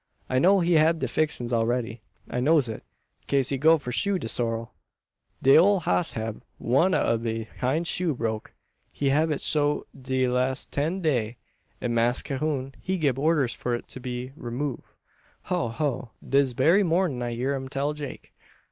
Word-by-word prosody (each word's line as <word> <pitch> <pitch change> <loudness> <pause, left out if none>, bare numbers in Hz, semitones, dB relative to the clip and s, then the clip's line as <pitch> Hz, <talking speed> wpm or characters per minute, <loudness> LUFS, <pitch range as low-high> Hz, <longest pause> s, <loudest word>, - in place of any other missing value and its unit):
I 130 - +1
know 190 +6 +5
he 175 +1 +2
hab 160 +1 +4
de - - -2
fixins 125 -6 -1
all 115 -1 +2
ready. 120 -2 -2 0.3
I 125 - -3
knows 145 0 +3
it, 110 - -6 0.4
kase 135 -2 +2
he 135 - 0
go 160 +3 +6
for 130 -5 -6
shoe 200 +9 +1
de 145 - -5
sorrel. 115 -1 -2 0.7
De 135 - +7
ole 195 +4 +6
hoss 90 - +1
hab 110 -1 -4 0.2
one 140 +10 +2
ob 115 -1 +1
de 115 -1 -2 0.2
hind 140 +7 0
shoe 170 -3 0
broke. 110 -2 -4 0.4
He 140 - -1
hab 155 +4 +2
it 150 - -2
so 145 -1 +1
de 130 0 -1
lass 125 +2 0
ten 160 +7 -2
day; 120 -7 0 0.4
an 120 - -1
Mass 120 +2 +2
Cahoon, 135 -1 -2
he 190 0 -1
gib 140 -6 0
orders 150 -4 +2
for 120 -1 -2
it 120 - -6
be 125 +1 -5
remove. 130 +2 -4 0.6
Ho 120 - -1
ho! 125 0 -2 0.2
dis 135 -2 +2
berry 165 - +4
mornin' 170 -7 +1
I 120 -1 -3
hear 130 +4 -1
um 130 -1 -5
tell 140 +2 -1
Jake." 145 -3 -8
135 Hz, 180 wpm, -26 LUFS, 120-155 Hz, 0.7 s, De